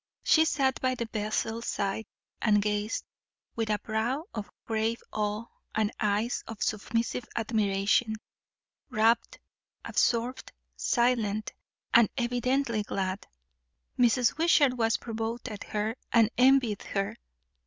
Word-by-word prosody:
She 320 Hz, 0 st, +5 dB
sat 270 Hz, -4 st, +1 dB
by 255 Hz, 0 st, +1 dB
the 235 Hz, -, -3 dB
vessel's 220 Hz, +2 st, -2 dB
side 200 Hz, +2 st, -2 dB, 0.3 s
and 210 Hz, -2 st, +4 dB
gazed, 210 Hz, +1 st, -1 dB, 0.5 s
with 225 Hz, -1 st, -1 dB
a 210 Hz, -, +2 dB
brow 225 Hz, +8 st, -1 dB
of 210 Hz, -2 st, -5 dB, 0.2 s
grave 225 Hz, +1 st, 0 dB
awe 210 Hz, +1 st, -1 dB, 0.3 s
and 215 Hz, 0 st, +1 dB
eyes 210 Hz, +3 st, 0 dB
of 225 Hz, -2 st, -4 dB
submissive 230 Hz, +3 st, -1 dB
admiration; 215 Hz, 0 st, +1 dB, 0.7 s
rapt, 225 Hz, +2 st, +2 dB, 0.5 s
absorbed, 240 Hz, +2 st, 0 dB, 0.2 s
silent, 215 Hz, -, +1 dB, 0.4 s
and 235 Hz, -3 st, +7 dB
evidently 245 Hz, -1 st, 0 dB
glad. 190 Hz, -1 st, -3 dB, 0.7 s
Mrs. 245 Hz, +3 st, +3 dB
Wishart 305 Hz, -5 st, +5 dB
was 225 Hz, -2 st, +2 dB
provoked 230 Hz, +1 st, -4 dB
at 210 Hz, -2 st, -7 dB
her, 215 Hz, +2 st, -2 dB, 0.2 s
and 230 Hz, -1 st, +5 dB
envied 255 Hz, -5 st, +4 dB
her. 195 Hz, -1 st, -2 dB
225 Hz, 115 wpm, -29 LUFS, 210-240 Hz, 0.7 s, and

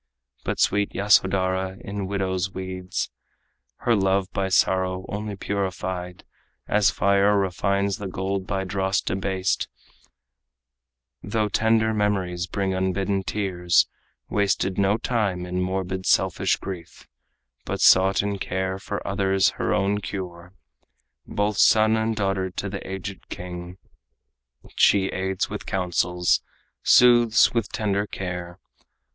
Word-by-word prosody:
But -, -, -3 dB
sweet 100 Hz, 0 st, +1 dB
Yasodhara, 95 Hz, -1 st, +2 dB
in 100 Hz, -1 st, -5 dB
widow's 95 Hz, -1 st, -1 dB
weeds, 95 Hz, 0 st, -4 dB, 0.7 s
Her 120 Hz, -, +3 dB
love 95 Hz, -1 st, +1 dB
by 95 Hz, 0 st, -1 dB
sorrow 95 Hz, 0 st, +1 dB
only 105 Hz, 0 st, -4 dB
purified 95 Hz, -2 st, -4 dB, 0.4 s
As 105 Hz, -2 st, +3 dB
fire 100 Hz, +2 st, +3 dB
refines 100 Hz, +1 st, 0 dB
the 100 Hz, -, -4 dB
gold 95 Hz, +1 st, -3 dB
by 95 Hz, -1 st, -1 dB
dross 95 Hz, +1 st, 0 dB
debased, 95 Hz, 0 st, -1 dB, 1.5 s
Though 105 Hz, +1 st, -1 dB
tender 110 Hz, +1 st, +2 dB
memories 95 Hz, -4 st, -1 dB
bring 95 Hz, +1 st, -1 dB
unbidden 95 Hz, +1 st, 0 dB
tears, 90 Hz, -3 st, +1 dB, 0.4 s
Wasted 95 Hz, -2 st, 0 dB
no 100 Hz, +2 st, +3 dB
time 105 Hz, -7 st, -1 dB
in 90 Hz, +1 st, -2 dB
morbid, 95 Hz, 0 st, -2 dB
selfish 95 Hz, -3 st, +2 dB
grief, 90 Hz, -4 st, -9 dB, 0.6 s
But -, -, -4 dB
sought 95 Hz, +1 st, +5 dB
in 100 Hz, -1 st, -2 dB
care 95 Hz, 0 st, -2 dB
for -, -, -5 dB
others 95 Hz, -1 st, +2 dB
her -, -, 0 dB
own 100 Hz, 0 st, +1 dB
cure. 90 Hz, -2 st, -7 dB, 0.7 s
Both 105 Hz, 0 st, -1 dB
son 110 Hz, +1 st, +5 dB
and 110 Hz, 0 st, 0 dB
daughter 95 Hz, -2 st, -1 dB
to 100 Hz, +2 st, -5 dB
the 100 Hz, 0 st, -5 dB
aged 95 Hz, 0 st, -7 dB
king, 90 Hz, 0 st, -7 dB, 1.0 s
She 95 Hz, -2 st, +4 dB
aids 95 Hz, +1 st, -2 dB
with 105 Hz, +1 st, -7 dB
counsels, 90 Hz, -2 st, +1 dB, 0.4 s
soothes 120 Hz, -2 st, +5 dB
with 115 Hz, -3 st, -1 dB
tender 105 Hz, -2 st, -1 dB
care. 90 Hz, -2 st, -5 dB
95 Hz, 120 wpm, -24 LUFS, 95-100 Hz, 1.5 s, sought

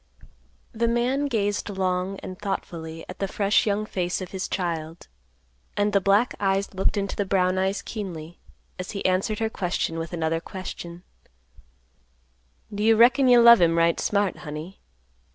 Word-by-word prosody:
The 230 Hz, +1 st, 0 dB
man 250 Hz, +5 st, +1 dB
gazed 205 Hz, -6 st, -1 dB
long 190 Hz, 0 st, -1 dB
and 185 Hz, -1 st, -8 dB
thoughtfully 165 Hz, -5 st, -5 dB
at 180 Hz, -, -9 dB
the 195 Hz, -, -1 dB
fresh 200 Hz, +2 st, +1 dB
young 210 Hz, +1 st, 0 dB
face 180 Hz, -3 st, -2 dB
of 185 Hz, -2 st, -7 dB
his 190 Hz, -1 st, -3 dB
child; 165 Hz, -3 st, -4 dB, 0.7 s
and 205 Hz, 0 st, +1 dB
the 200 Hz, -, +3 dB
black 200 Hz, +5 st, +3 dB
eyes 195 Hz, 0 st, 0 dB
looked 190 Hz, +2 st, 0 dB
into 200 Hz, -1 st, -2 dB
the 205 Hz, -, 0 dB
brown 185 Hz, -1 st, +1 dB
eyes 190 Hz, +1 st, -1 dB
keenly, 175 Hz, -6 st, -7 dB, 0.4 s
as 185 Hz, -, -5 dB
he -, -, -5 dB
answered 185 Hz, +4 st, +1 dB
her 225 Hz, 0 st, 0 dB
question 175 Hz, -4 st, -2 dB
with 165 Hz, -1 st, -5 dB
another 165 Hz, -1 st, -1 dB
question, 175 Hz, -1 st, -8 dB, 1.7 s
"Do 205 Hz, -, -4 dB
you 225 Hz, +1 st, +5 dB
reckon 255 Hz, +4 st, +5 dB
you 245 Hz, -1 st, +7 dB
love 235 Hz, -3 st, +9 dB
him 165 Hz, -1 st, +3 dB
right 165 Hz, 0 st, +3 dB
smart, 200 Hz, -2 st, 0 dB
honey? 155 Hz, +5 st, -8 dB
195 Hz, 160 wpm, -25 LUFS, 175-210 Hz, 1.7 s, love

